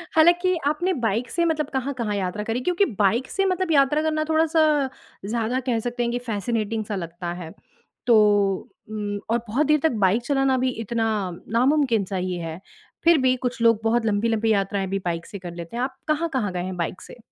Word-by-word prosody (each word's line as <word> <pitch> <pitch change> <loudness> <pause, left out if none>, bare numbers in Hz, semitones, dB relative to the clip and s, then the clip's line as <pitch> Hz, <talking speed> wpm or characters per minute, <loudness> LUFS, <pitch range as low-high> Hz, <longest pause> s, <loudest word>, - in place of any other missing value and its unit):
हालाँकि 350 +3 +5
आपने 350 +5 +1
बाइक 225 +4 0
से 340 - +1
मतलब 310 -3 0
कहाँ-कहाँ 255 -5 -2
यात्रा 195 +2 -2
करी? 225 +3 -2
क्योंकि 360 +8 +2
बाइक 225 +6 +2
से 390 - +1
मतलब 370 -2 0
यात्रा 285 +1 +4
करना 310 0 0
थोड़ा-सा 315 -3 +3 0.4
ज़्यादा 230 +4 -1
कह 245 -3 -1
सकते 240 +1 -2
हैं 235 - 0
कि 245 - -1
फ़ैसिनेटिंग 220 0 -2
-सा 205 - -3
लगता 170 -1 -5
है। 165 -1 -8 0.5
तो 235 - +6 0.7
उम 205 -1 -3
और 230 - +3
बहुत 265 +8 +1
देर 305 0 +4
तक 320 - +4
बाइक 210 +6 +2
चलाना 270 -1 +2
भी 255 +1 +1
इतना 225 +1 -1 0.5
नामुमकिन-सा 240 -6 +2
ही 180 -1 -2
है। 165 0 -5 0.4
फिर 335 0 +6
भी 255 0 +3
कुछ 245 -1 -3
लोग 230 -2 +5
बहुत 225 +1 +2
लंबी-लंबी 220 +1 +1
यात्राएँ 195 -1 0
भी 195 +1 -2
बाइक 170 -1 -2
से 205 -3 -8
कर 175 -2 -7
लेते 170 +7 -7
हैं। 245 - 0
आप 260 0 -4
कहाँ-कहाँ 300 - 0
गए 180 -1 -2
हैं 185 0 -5
बाइक 170 +1 -3
से? - - -12
235 Hz, 195 wpm, -24 LUFS, 205-295 Hz, 0.7 s, तो